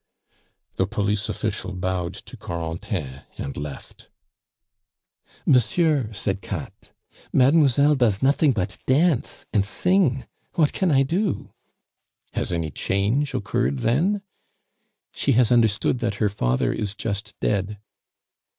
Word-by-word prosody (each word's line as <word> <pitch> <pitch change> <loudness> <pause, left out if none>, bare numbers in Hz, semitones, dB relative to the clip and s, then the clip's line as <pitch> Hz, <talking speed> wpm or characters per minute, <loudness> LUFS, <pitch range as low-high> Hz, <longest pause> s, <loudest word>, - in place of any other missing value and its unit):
The 95 - +1
police 105 +1 -1
official 105 -3 -3
bowed 90 -1 -2
to - - -12
Corentin 80 -4 -5 0.2
and 70 - -5
left. 70 -1 -8 1.4
"Monsieur," 135 -1 +3
said 100 -2 -2
Katt. - - -7 0.4
"Mademoiselle 140 +1 +4
does 120 -7 +2
nothing 140 +2 +4
but 95 -4 -2
dance 145 0 +2
and 105 -3 +3
sing. 135 - +1 0.3
What 155 -3 +3
can 190 - +1
I 135 -3 +4
do?" 180 +8 -1 0.8
"Has - - -2
any 85 -3 -2
change 105 - 0
occurred 70 -8 0
then?" 180 - +1 0.9
"She 140 - +1
has 120 0 +3
understood 115 0 +3
that 115 -4 -1
her 105 0 +1
father 65 -11 0
is 105 0 -3
just 105 -2 -4
dead." 105 0 -1
110 Hz, 115 wpm, -24 LUFS, 95-135 Hz, 1.4 s, Mademoiselle